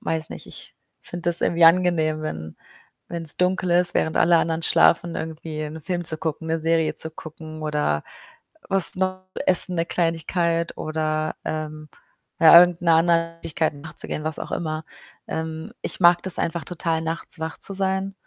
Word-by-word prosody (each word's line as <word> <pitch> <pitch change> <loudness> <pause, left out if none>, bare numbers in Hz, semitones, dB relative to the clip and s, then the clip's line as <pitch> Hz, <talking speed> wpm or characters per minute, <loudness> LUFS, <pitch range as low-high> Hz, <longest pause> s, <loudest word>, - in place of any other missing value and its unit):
weiß 160 -1 -3
nicht, - - -9
ich - - -12 0.3
finde 175 0 -3
das 170 - +6
irgendwie 170 0 +3
angenehm, 165 -2 +4
wenn 80 - -6 0.5
wenn's 165 -3 -2
dunkel 180 0 +1
ist, 175 0 +3
während 160 - 0
alle 170 0 +5
anderen 165 0 -1
schlafen, 170 +1 +3
irgendwie 160 -1 -5
'n 155 +1 -6
Film 175 +2 -3
zu 160 -1 -2
gucken, 160 0 -4
'ne 165 0 0
Serie 160 0 +1
zu 160 - 0
gucken 155 0 -10
oder 150 - 0 0.7
was 195 -2 +2
noch 185 0 -1 0.2
essen, 180 0 +3
'ne 165 - +1
Kleinigkeit 170 0 -1
oder, 155 0 -2
ähm, 155 -1 -5 0.5
ja, 165 +1 +10
irgend 175 -1 +3
'ner 165 -2 +4
anderen 165 0 +2
Tätigkeit 160 -1 -1
nachzugehen, 150 +1 -6
was 155 -1 -3
auch - - -7
immer. 155 -2 -3 0.4
Ähm, 160 0 -5
ich - - -3
mag 175 0 +6
das 190 - 0
einfach 165 -2 -2
total, 165 -1 -2
nachts 165 0 -3
wach 160 0 -4
zu - - -4
sein. 190 0 -1
165 Hz, 165 wpm, -23 LUFS, 155-175 Hz, 0.7 s, ja